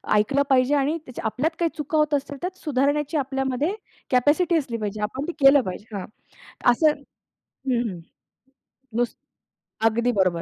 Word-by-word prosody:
ऐकलं 240 +7 +3
पाहिजे 265 +1 +4
आणि 290 +3 +1
त्या 250 - -8
आपल्यात 255 +10 0
काही 335 - +2
चुका 305 +1 -1
होत 300 -1 +2
असतील 285 0 -1
त्यात 370 +1 -4
सुधारण्याची 295 +1 +1
आपल्यामध्ये 270 +4 -1 0.4
कॅपॅसिटी 300 +7 +3
असली 260 -7 -2
पाहिजे. 210 -1 -4
आपण 260 +7 -3
ते 350 - -1
केलं 275 0 +8
पाहिजे 205 +1 -7
हां. 190 - -5 0.7
असं 310 +6 +4 0.6
हं, 255 -3 -2
हं. 180 -3 -7 1.0
नुस 240 -1 0 0.7
अगदी 235 +2 +2
बरोबर. 185 -6 +1
270 Hz, 150 wpm, -24 LUFS, 235-295 Hz, 1.0 s, केलं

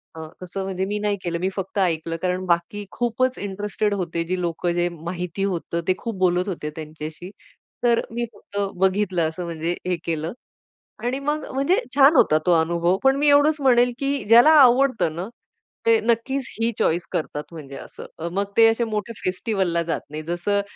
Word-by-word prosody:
अ, 160 -1 -7 0.2
तसं 180 +2 -5
म्हणजे 190 0 -2
मी 205 +2 -2
नाही 205 -1 0
केलं, 170 -1 -2
मी 185 +2 0
फक्त 195 +1 -5
ऐकलं. 165 -3 0
कारण 185 0 -1
बाकी 175 +4 -1
खूपच 245 +2 0
इंटरेस्टेड 205 +1 -2
होते 170 -3 -2
जी 180 +2 -2
लोकं 175 0 -1
जे 175 0 +1
माहिती 170 +3 -5
होतं. 170 -3 -2
ते 185 - +4
खूप 230 -3 -5
बोलत 180 0 +2
होते 160 -5 -4
त्यांच्याशी. 155 +2 -8 0.5
तर 235 -1 +3
मी 240 +1 -1
फक्त 200 0 -11 0.2
बघितलं 190 -3 +1
असं 160 +3 -6
म्हणजे 170 +1 -3
हे 180 - +1
केलं. 165 +1 -2 0.7
आणि 250 +3 -1
मग 295 +2 -2
म्हणजे 275 +8 +2 0.2
छान 285 +3 +6
होता 155 - +5
तो 180 - +3
अनुभव, 170 +3 +1
पण 270 0 +5
मी 295 +1 +2
एवढंच 290 +2 +5
म्हणेल, 245 -2 +4
की 275 -3 -1
ज्याला 240 +7 +8
आवडतं 255 - +4
ना, 175 +3 -4 0.6
ते 455 -1 +5
नक्कीच 245 +3 0
ही 230 +1 +2
चॉईस 170 +2 +1
करतात 150 -1 -3
म्हणजे 145 -5 -9
असं, - - -10 0.3
मग 200 +2 +1
ते 225 0 +8
असे 225 +1 +2
मोठे 220 0 -3
फेस्टिव्हलला 185 -2 0
जात 165 -1 -2
नाही 155 +1 -6
जसं 175 +5 -1
190 Hz, 180 wpm, -23 LUFS, 170-235 Hz, 0.7 s, ज्याला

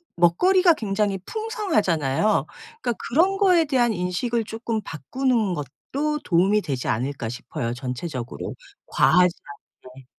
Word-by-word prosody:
먹거리가 345 - +4
굉장히 205 -6 -1
풍성하잖아요. 215 - 0 0.4
그러니까 240 - 0 0.2
'그런 355 +9 +3
거에 365 -5 +4
대한 250 -5 +2
인식을 210 +6 -1
쪼끔 225 0 -3
바꾸는 220 - -1
것도 275 - -3
도움이 190 +4 +3
되지 135 -8 -4
않을까.' 125 0 -2
싶어요. 125 0 -4
전체적으로 125 0 -5 0.3
과하지 180 +1 +4 0.5
않게. 130 +1 -14
200 Hz, 320 characters per minute, -23 LUFS, -, 0.5 s, 먹거리가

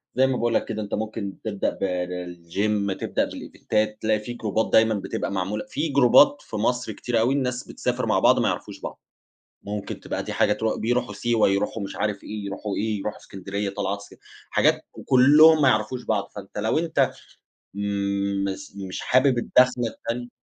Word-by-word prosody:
زي 130 +1 +4
ما 130 -1 0
باقول 120 -1 0
لَك - - +1
كده 110 0 -4
أنتَ 105 - -6
ممكن 110 -2 -3
تبدأ 105 -3 -1
ب - - -9
بالgym 90 +2 -2
تبدأ - - -1
بالإيڤنتات 105 0 -2
تلاقي 110 0 +2
في 120 +3 -6
جروبات 110 -1 -1
دايمًا 110 0 +5
بتبقى 100 - -3
معمولة 100 +2 -2
في 150 +3 -2
جروبات 140 +2 +5
في - - -9
مصر 120 +4 0
كتير 120 -2 -1
أوي 120 +4 +2
الناس 125 -2 -1
بتسافر - - -2
مع - - +2
بعض - - +5
ما - - +2
يعرفوش - - -4
بعض. - - -7 0.6
ممكن 100 0 -5
تبقى - - -4
دي - - -5
حاجة - - +3
ترو 110 0 -1
بيروحوا 120 -1 0
سيوة، 115 +2 +2
يروحوا 100 +2 -1
مش 100 - -6
عارف 105 -1 -2
إيه، 105 -1 -6
يروحوا 100 +1 -4
إيه، 110 0 -1
يروحوا 100 +1 -4
إسكندرية 100 +1 -4
طلعات 100 0 -2
اس 100 - -13 0.4
حاجات - - +3
وكلّهم 150 +4 +6
ما 140 - +6
يعرفوش 115 +2 0
بعض، 105 -2 -1
فأنتَ 100 0 -8
لو 110 +7 +1
أنتَ 165 -1 +1 0.6
مس 100 -1 -2
مش 95 -2 -5
حابب 130 -1 +3
الداخلة 125 0 +3
التاني 120 +2 -5
105 Hz, 180 wpm, -24 LUFS, 100-120 Hz, 0.6 s, وكلّهم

